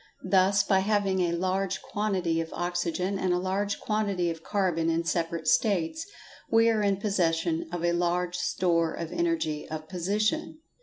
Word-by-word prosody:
Thus 195 +1 +4
by 195 -1 +3
having 200 -1 +1
a 175 -2 +1
large 190 +2 -1
quantity 185 -6 -1
of 165 - -6
oxygen 175 +2 -2
and 185 -2 +1
a - - +1
large 195 +2 -1
quantity 200 -5 0
of 165 -1 -7
carbon 175 -4 0
in 165 0 +1
separate 165 -1 -2
states, 210 - +1 0.4
we 230 0 +5
are 220 -2 +2
in 200 -1 +2
possession 170 -4 0
of 175 -1 -2
a 170 - +2
large 175 +1 0
store 170 -2 +1
of 165 -1 -5
energy 330 - -1
of 155 0 -6
position. 210 - -1
185 Hz, 160 wpm, -28 LUFS, 170-200 Hz, 0.4 s, we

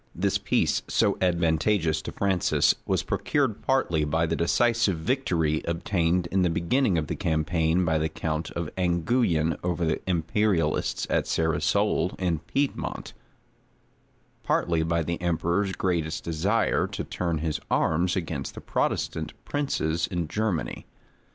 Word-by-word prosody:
This - - +1
peace, - - +1
so - - +2
advantageous 85 -1 +2
to - - -6
Francis, 95 -4 +2
was - - +1
procured - - 0
partly 80 -3 +1
by 80 +2 +1
the 80 0 -1
decisive 115 +3 +2
victory 80 - 0
obtained 85 0 0
in 95 - +2
the 90 - +3
beginning 90 +5 +1
of 80 - 0
the - - -3
campaign 80 0 +1
by 80 -2 +2
the 80 +1 0
count 80 0 -3
of 85 -3 -4
Anguyen 85 - +1
over 85 -1 0
the 80 - 0
imperialists 85 -1 +1
at - - 0
Cerisolles 80 +2 +1
in 90 -4 0
Piedmont, 135 - -3 1.3
partly 85 -2 +1
by 85 +1 0
the 85 +2 -3
emperor's 85 +3 0
great 90 -5 0 0.2
desire 95 +8 +1
to - - -5
turn 85 -3 -2
his 80 0 -2
arms 85 +3 +1
against 90 -4 -4
the - - -8
Protestant 80 -1 -1
princes 85 - -1
in 90 -4 -2
Germany. 90 - -2
85 Hz, 135 wpm, -26 LUFS, 80-95 Hz, 1.3 s, the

